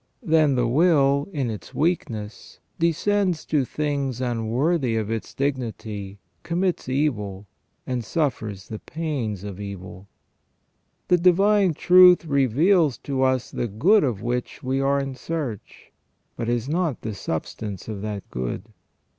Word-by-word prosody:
Then 155 - +3
the 120 -2 +2
will, 140 0 +3
in 135 -8 -2
its 105 - -9
weakness, 115 - -2 0.2
descends 175 +2 +1
to 150 -3 +1
things 140 -2 -2
unworthy 125 +3 0
of 110 -1 -1
its 115 -1 -4
dignity, 110 -7 -3 0.2
commits 175 -4 -1
evil, 105 -9 -1 0.4
and 125 -2 -2
suffers 110 - -2
the 110 - -5
pains 135 - -4
of 100 -2 -7
evil. 100 -1 -8 1.0
The 180 - +5
divine 190 0 +4
truth 180 0 +7
reveals 145 - +3
to 135 -2 -2
us 130 -2 +1
the 120 - -2
good 175 - +4
of 115 -7 -1
which 125 +1 -3
we 130 +1 0
are 140 +1 +2
in 135 -1 -3
search, 130 -5 -6 0.4
but 115 - -3
is 120 0 -1
not 160 -3 -1
the 110 - -4
substance 100 +2 -5
of 105 -3 -5
that 105 -2 -5
good. 60 -1 -3
130 Hz, 135 wpm, -24 LUFS, 110-160 Hz, 1.0 s, truth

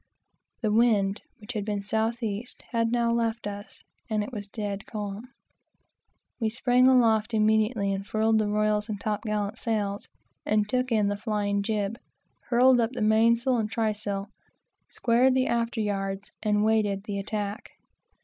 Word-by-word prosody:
The 215 - +2
wind, 215 -3 +3 0.2
which 215 +3 -8
had 210 -3 -2
been 205 -1 -3
south 225 +3 -1
east, 215 +2 -4
had 230 -1 +1
now 235 -1 +2
left 230 -1 -1
us, 205 0 -7 0.3
and 215 -1 0
it 225 - -8
was 205 -3 -5
dead 205 -1 -5
calm. 210 +1 -5 1.1
We 225 -2 +1
sprang 250 +2 +3
aloft 225 -3 +3
immediately 215 -1 +2
and 195 0 -3
furled 220 +2 +1
the 215 - +1
royals 210 +1 +1
and 205 -2 -3
top 210 0 -2
gallant 210 0 -2
sails, 205 -4 -2 0.4
and 210 -1 +1
took 255 +2 -1
in 215 -3 +3
the 205 - -2
flying 205 -2 -1
jib, 210 +2 -2 0.5
hauled 250 +1 +5
up 230 +1 0
the 250 - -4
mainsail 230 +4 +3
and 215 -2 -1
trysail, 210 -3 -2 0.6
squared 250 +2 +2
the 260 0 +2
after 235 -1 -1
yards, 195 -1 -3
and 210 -1 +1
awaited 210 -2 +1
the 205 -1 -4
attack. 205 +2 -4
215 Hz, 160 wpm, -27 LUFS, 205-230 Hz, 1.1 s, hauled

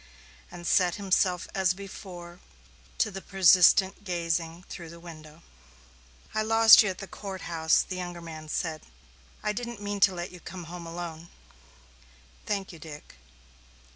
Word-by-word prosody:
And 175 -1 -10
set 175 -1 +3
himself 185 -3 +1
as 190 -1 +2
before 180 -3 -10 0.6
to 220 -2 +1
the 195 0 -7
persistent 190 +1 +5
gazing 170 -2 -2
through 170 -2 -8
the 170 +1 -11
window. 160 -1 -12 0.9
"I 215 - +1
lost 225 0 +8
you 210 - +1
at 185 - -4
the 195 - -7
court 195 -1 -8
house," 160 -2 +2
the 185 - -4
younger 175 -1 -5
man 160 -2 -9
said. 155 -1 -2 0.6
"I 210 0 0
didn't 235 0 -5
mean 205 0 -4
to 190 -1 +5
let 175 +2 -5
you 180 - -11
come 180 +1 -8
home 170 +1 -8
alone." 170 -1 -7 1.2
"Thank 195 -3 -2
you, 165 - -12
Dick." 150 -2 -11
180 Hz, 150 wpm, -28 LUFS, 170-195 Hz, 1.2 s, lost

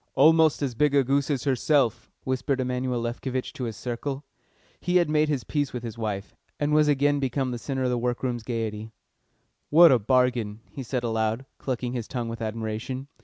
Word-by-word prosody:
"Almost 160 +1 +5
as 130 -3 -1
big 145 +4 +2
a 140 - +5
goose 140 +2 +1
as 135 -4 0
herself!" 135 -2 +1
whispered 130 +1 -1
Emanuel 125 -1 -1
Lefkovitch 125 +2 -3
to 125 - -4
his 110 -4 -5
circle. 135 +6 -4 0.5
He 180 - -1
had 170 -4 +4
made 155 0 +3
his 140 -5 -1
peace 145 -3 -2
with 125 -1 -5
his 115 -2 -5
wife, 105 -3 -4 0.3
and 145 0 +1
was 150 0 +5
again 145 0 +3
become 130 -1 -1
the 120 - -4
centre 130 +1 -3
of 125 - +1
the 120 - 0
work 120 +1 -2
room's 120 -2 -1
gaiety. 110 -2 -4 0.8
"What 165 +1 +8
a 125 - +5
bargain!" 120 -2 +1
he 140 - -7
said 125 0 -3
aloud, 110 +2 -1
clucking 125 -2 -3
his 120 -3 -4
tongue 120 -3 -3
with 115 0 -6
admiration. 110 +4 -4
125 Hz, 195 wpm, -26 LUFS, 115-140 Hz, 0.8 s, What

